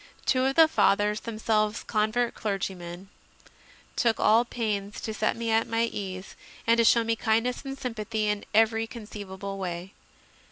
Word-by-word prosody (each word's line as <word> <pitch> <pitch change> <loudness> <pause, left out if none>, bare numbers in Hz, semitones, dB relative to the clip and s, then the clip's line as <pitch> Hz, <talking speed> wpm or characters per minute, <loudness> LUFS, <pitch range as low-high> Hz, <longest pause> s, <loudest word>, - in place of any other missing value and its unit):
Two 255 0 +2
of 270 0 +1
the 325 -1 +8
Fathers, 210 -8 +2
themselves 215 -1 -1
convert 220 +2 0
clergymen, 190 -3 -4 0.9
took 230 -2 +2
all 225 +3 +5
pains 210 -4 -3
to 220 - -4
set - - 0
me 230 -1 -2
at 225 +1 +2
my 230 0 +1
ease 195 -4 -5 0.3
and 230 +1 +4
to - - +6
show 230 0 +5
me 225 0 0
kindness 230 +2 0
and 270 0 -6
sympathy 220 -4 -3
in 210 -1 -1
every 225 +1 +3
conceivable 200 -3 -7
way. 180 0 -5
220 Hz, 155 wpm, -27 LUFS, 205-230 Hz, 0.9 s, the